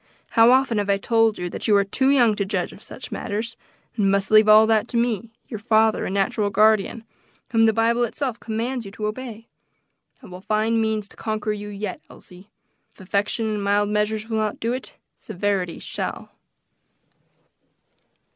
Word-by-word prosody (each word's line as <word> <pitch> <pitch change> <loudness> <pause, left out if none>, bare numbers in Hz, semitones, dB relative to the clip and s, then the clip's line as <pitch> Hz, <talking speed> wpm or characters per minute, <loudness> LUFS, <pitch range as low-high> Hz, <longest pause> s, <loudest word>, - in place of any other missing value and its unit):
How 230 +1 +5
often 255 -3 +3
have 205 0 -2
I 200 - +3
told 225 +1 +2
you 180 - -4
that - - -5
you 210 - +4
are 200 - +4
too 265 +7 0
young 240 -6 +4
to 200 - 0
judge 190 -3 -3
of - - -15
such - - -10
matters, 225 +3 -4 0.4
and 205 -3 +2
must 195 0 0
leave 215 0 +6
all 215 +1 +8
that 220 0 +2
to 240 - -3
me, 230 -2 -1 0.2
your 220 - -6
father 220 0 +2
and 190 - -3
natural 200 +1 0
guardian, 215 +2 +2 0.5
whom 225 -1 +4
the - - +5
Bible 230 +2 +1
itself 245 +1 -3
commands 235 +3 -3
you 200 - -8
to 215 0 -5
obey. 225 0 -6 0.8
I - - -11
will 180 -2 -10
find 220 +3 0
means 220 -2 -1
to - - -14
conquer 215 -1 -2
you 210 0 -7
yet, 200 -2 -5
Elsie. 185 +3 -15 0.4
If - - -26
affection 200 +4 -1
and 210 -2 -2
mild 205 +1 +1
measures 210 +1 -1
will 220 -1 -1
not 215 -1 -2
do 230 +2 -1
it, 255 - -7 0.2
severity 195 -3 -3
shall." - - -5
215 Hz, 185 wpm, -23 LUFS, 205-225 Hz, 0.8 s, all